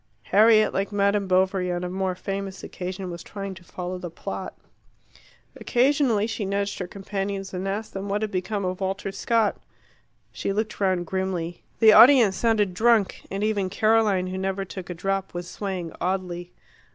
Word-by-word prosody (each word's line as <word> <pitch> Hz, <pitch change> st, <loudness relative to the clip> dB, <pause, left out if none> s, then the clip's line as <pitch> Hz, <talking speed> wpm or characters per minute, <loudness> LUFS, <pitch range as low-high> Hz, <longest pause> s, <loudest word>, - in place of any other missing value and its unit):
Harriet, 215 Hz, -, +5 dB
like 195 Hz, +1 st, -1 dB
M. 200 Hz, 0 st, +1 dB
Bovary 185 Hz, 0 st, +2 dB
on 175 Hz, 0 st, -2 dB
a -, -, -2 dB
more 185 Hz, 0 st, -2 dB
famous 195 Hz, 0 st, -5 dB
occasion, 185 Hz, 0 st, -5 dB
was 170 Hz, 0 st, -7 dB
trying 195 Hz, +1 st, -6 dB
to 185 Hz, 0 st, -13 dB
follow 180 Hz, +1 st, -6 dB
the 180 Hz, -1 st, -6 dB
plot. 165 Hz, -, -6 dB, 1.0 s
Occasionally 250 Hz, -4 st, +2 dB
she 220 Hz, -1 st, -3 dB
nudged 200 Hz, +1 st, -2 dB
her 180 Hz, -, -3 dB
companions, 195 Hz, 0 st, -4 dB
and 185 Hz, +1 st, -3 dB
asked 205 Hz, +3 st, -3 dB
them 195 Hz, +1 st, -5 dB
what 205 Hz, +2 st, 0 dB
had 215 Hz, -, -2 dB
become 195 Hz, +2 st, -2 dB
of 185 Hz, +1 st, -3 dB
Walter 195 Hz, +1 st, -2 dB
Scott. 220 Hz, +2 st, +1 dB, 0.7 s
She -, -, -3 dB
looked 215 Hz, +1 st, -2 dB
round 185 Hz, -3 st, +1 dB
grimly. 180 Hz, -2 st, -3 dB, 0.2 s
The 220 Hz, -1 st, +7 dB
audience 230 Hz, -3 st, +8 dB
sounded 215 Hz, -5 st, +1 dB
drunk, 220 Hz, 0 st, +2 dB
and 195 Hz, +1 st, -3 dB
even 205 Hz, -3 st, 0 dB
Caroline, 215 Hz, -2 st, +2 dB
who 185 Hz, +1 st, -4 dB
never 195 Hz, 0 st, -2 dB
took 185 Hz, -1 st, -8 dB
a 180 Hz, -, -4 dB
drop, 195 Hz, +1 st, -2 dB
was 175 Hz, 0 st, -4 dB
swaying 185 Hz, -4 st, -4 dB
oddly. 180 Hz, -1 st, -2 dB
195 Hz, 170 wpm, -25 LUFS, 185-210 Hz, 1.0 s, audience